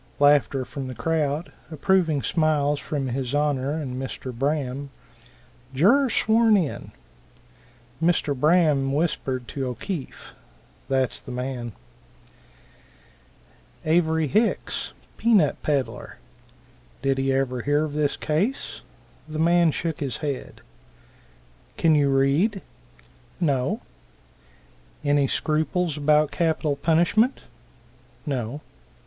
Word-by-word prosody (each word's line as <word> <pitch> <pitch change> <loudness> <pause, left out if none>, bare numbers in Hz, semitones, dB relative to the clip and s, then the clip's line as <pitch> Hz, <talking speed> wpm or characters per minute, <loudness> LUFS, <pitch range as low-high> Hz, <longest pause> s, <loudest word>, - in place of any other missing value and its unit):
(Laughter 145 -2 +4
from 135 +1 -6
the 130 - -7
crowd, 150 +4 -1 0.2
approving 160 -2 +1
smiles 150 -3 +1
from 140 -3 -3
his 130 +1 -2
Honor 145 -2 0
and 135 -5 -4
Mr. 130 -1 -6
Braham.) 140 +1 -2 0.9
Juror 245 - +4
sworn 220 -1 +4
in. 170 -7 -3 1.1
Mr. 165 -4 +2
Braham 150 -2 +3
whispered 135 -5 -1
to 135 -2 -3
O'Keefe, 135 - -6 0.6
"that's 130 -2 0
the - - -12
man." 125 -2 -4 2.1
Avery 160 0 +2
Hicks, 215 - 0 0.2
pea 235 0 +3
nut 155 -8 +3
peddler. 140 -4 -2 0.9
Did 135 -1 +1
he 135 0 +1
ever 130 -2 0
hear 145 +4 +1
of 150 - -6
this 150 -1 0
case? 190 - -1 0.5
The 155 0 -6
man 170 +1 +4
shook 160 +1 -3
his 140 -4 -3
head. 145 -4 -5 1.2
"Can 165 -1 +4
you 145 -2 +3
read?" 140 +10 +2 0.8
"No." 140 -7 0 1.2
"Any 145 -1 +3
scruples 155 +3 0
about 150 0 +3
capital 160 -3 0
punishment?" 170 - +2 0.8
"No." 135 -1 -3
145 Hz, 105 wpm, -24 LUFS, 135-165 Hz, 2.1 s, Laughter